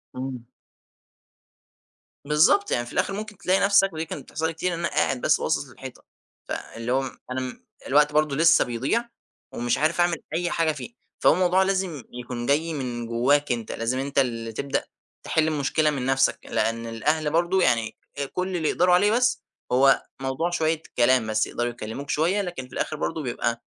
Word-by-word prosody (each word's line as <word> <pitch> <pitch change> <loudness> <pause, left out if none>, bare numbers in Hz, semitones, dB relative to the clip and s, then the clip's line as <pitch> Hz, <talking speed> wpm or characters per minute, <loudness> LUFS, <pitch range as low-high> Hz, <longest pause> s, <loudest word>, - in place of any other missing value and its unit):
إمم. 130 -2 -5 1.8
بالضبط، 155 - +4
يعني 120 - 0
في 120 - -11
الآخر - - 0
ممكن 210 0 -6
تلاقي 190 +1 +2
نفسك- 200 -2 +4
ودي 160 +1 -3
كانت - - -7
بتحصل 160 +1 -3
لي 165 - -3
كتير- 175 +2 -2
إن 165 - -4
أنا 170 - 0
قاعد 130 -4 0
بس - - +3
باصص - - 0
للحيطة، - - -11 0.4
فاللي 115 +1 -5
هو 135 +1 +2 0.3
أنا 130 0 -4 0.3
الوقت 150 +2 +4
برضو 150 -2 +2
لسه 165 +3 +5
بيضيع 135 - -1 0.4
ومش 120 0 0
عارف 155 +5 +1
أعمل 175 -2 +2 0.2
أي 175 +1 -1
حاجة 165 -1 +2
فيه، 155 - -8 0.3
فهو - - +5
الموضوع 185 +2 +3
لازم 190 -7 -1
يكون 120 -1 -5
جاي 155 +5 +1
من 120 -4 -4
جواك 130 +5 +2
أنت، 115 -2 -2
لازم 120 +3 -2
أنت 140 +1 -1
اللي 115 -3 -1
تبدأ 140 +5 -2 0.4
تحل 160 -1 +1
المشكلة 155 0 +1
من 135 -4 -2
نفسك، 135 0 +2
لأن 115 +1 -1
الأهل 150 +7 0
برضو 175 +3 +2
يعني 115 -5 +1 0.4
كل 185 0 -2
اللي 160 -3 0
يقدروا 180 0 +3
عليه 205 +4 +4
بس 245 +1 +2 0.3
هو 135 +2 +4 0.2
موضوع 135 +6 -1
شوية 160 -2 0 0.2
كلام 125 -1 +4
بس، 110 0 +1
يقدروا 120 0 -2
يكلموك 120 +4 -7
شوية، 175 +7 +1
لكن 175 -9 -6
في - - -18
الآخر 155 - -2
برضو 160 +2 -2
بيبقى 120 -1 -2
150 Hz, 175 wpm, -25 LUFS, 125-170 Hz, 1.8 s, لسه